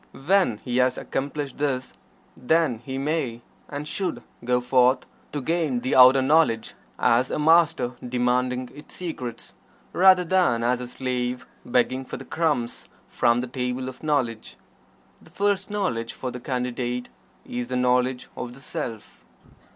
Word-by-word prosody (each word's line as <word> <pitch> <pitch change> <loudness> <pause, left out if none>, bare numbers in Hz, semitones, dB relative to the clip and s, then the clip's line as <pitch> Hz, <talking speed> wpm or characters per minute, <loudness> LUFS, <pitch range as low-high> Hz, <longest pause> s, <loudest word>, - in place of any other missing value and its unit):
When 170 - +2
he 125 -1 -1
has 125 0 +3
accomplished 140 +1 -4
this, 135 -3 -1 0.4
then 150 -3 +1
he 130 +2 -6
may, 135 -5 -2 0.3
and 145 +1 -5
should, 150 -7 -3 0.2
go 125 +1 +2
forth 125 +1 +3 0.3
to 145 - -3
gain 155 -4 0
the 130 - 0
outer 130 +1 +8
knowledge 140 -6 +2 0.2
as 125 +3 +3
a - - -2
Master 160 -4 +4 0.2
demanding 125 0 0
its 150 - -12
secrets, 125 -10 -6 0.4
rather 185 0 +6
than 175 -10 +2
as 125 +1 +1
a 125 - -5
slave 125 0 -3 0.2
begging 130 +2 +1
for - - -7
the - - -10
crumbs 150 -8 -1 0.2
from 120 0 +2
the 130 - -4
table 125 0 -3
of 130 -1 -8
knowledge. 130 -8 -1 0.6
The - - -17
first 200 -1 0
knowledge 180 - -2
for 130 - -5
the 125 - -7
Candidate 125 -1 -3 0.4
is 120 0 -4
the 125 - -3
knowledge 125 0 +1
of 120 -1 -6
the 130 - -13
Self. 115 -4 -6
130 Hz, 150 wpm, -25 LUFS, 125-150 Hz, 0.6 s, outer